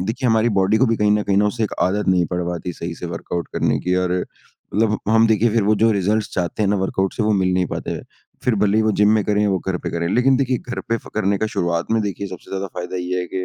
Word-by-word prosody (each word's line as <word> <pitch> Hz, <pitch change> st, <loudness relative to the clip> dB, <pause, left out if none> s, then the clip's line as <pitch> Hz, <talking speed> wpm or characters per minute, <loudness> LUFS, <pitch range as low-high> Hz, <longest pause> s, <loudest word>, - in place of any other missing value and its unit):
देखिए 115 Hz, +7 st, -1 dB
हमारी 110 Hz, +1 st, +3 dB
बॉडी 95 Hz, +3 st, +3 dB
को 130 Hz, -, +4 dB
भी 115 Hz, -1 st, +1 dB
कहीं 105 Hz, -1 st, +2 dB
न 105 Hz, 0 st, +2 dB
कहीं 100 Hz, -1 st, 0 dB
न 100 Hz, -, +4 dB
उसे 105 Hz, +2 st, 0 dB
एक 105 Hz, -, -4 dB
आदत 100 Hz, +3 st, 0 dB
नहीं 90 Hz, -2 st, +3 dB
पड़ 90 Hz, 0 st, -1 dB
पाती 90 Hz, 0 st, -4 dB
सही 85 Hz, +1 st, -6 dB
से 85 Hz, -, -7 dB
वर्कआउट 85 Hz, 0 st, -4 dB
करने -, -, +1 dB
की 90 Hz, +1 st, 0 dB
और 90 Hz, -, -1 dB, 0.6 s
मतलब 110 Hz, 0 st, +2 dB
हम 115 Hz, +1 st, +5 dB
देखिए 110 Hz, +1 st, +3 dB
फिर 115 Hz, 0 st, +2 dB
वो 105 Hz, +2 st, +3 dB
जो 115 Hz, -, +5 dB
रिज़ल्ट्स 105 Hz, +2 st, 0 dB
चाहते 90 Hz, +3 st, -1 dB
हैं 100 Hz, -, +2 dB
ना 105 Hz, -, +2 dB
वर्कआउट 95 Hz, 0 st, -1 dB
से -, -, -1 dB
वो 110 Hz, 0 st, +2 dB
मिल 95 Hz, -2 st, +2 dB
नहीं 90 Hz, 0 st, +1 dB
पाते -, -, -5 dB
हैं। -, -, -4 dB, 0.4 s
फिर 125 Hz, -, +2 dB
भले 105 Hz, 0 st, +2 dB
ही 110 Hz, -, +4 dB
वो 110 Hz, -, +2 dB
जिम 105 Hz, -, +6 dB
में 110 Hz, -, +2 dB
करे 105 Hz, +1 st, +1 dB
वो 95 Hz, -2 st, +1 dB
घर 95 Hz, 0 st, -3 dB
पे -, -, -3 dB
करें। 85 Hz, 0 st, -2 dB
लेकिन 130 Hz, +2 st, +4 dB
देखिए, 130 Hz, -2 st, 0 dB
घर 120 Hz, +1 st, -6 dB
पे 115 Hz, -, +2 dB
फ़ -, -, -12 dB
करने 100 Hz, -1 st, +1 dB
का 110 Hz, -, 0 dB
शुरुआत 85 Hz, -1 st, 0 dB
में 115 Hz, -, +3 dB
देखिए, 100 Hz, -1 st, -3 dB
सबसे 95 Hz, -2 st, -10 dB
ज़्यादा 95 Hz, 0 st, -3 dB
फ़ायदा 90 Hz, +1 st, -5 dB
ये 90 Hz, 0 st, -2 dB
है 90 Hz, -, -4 dB
कि 95 Hz, +1 st, -4 dB
100 Hz, 290 wpm, -20 LUFS, 90-110 Hz, 0.6 s, जिम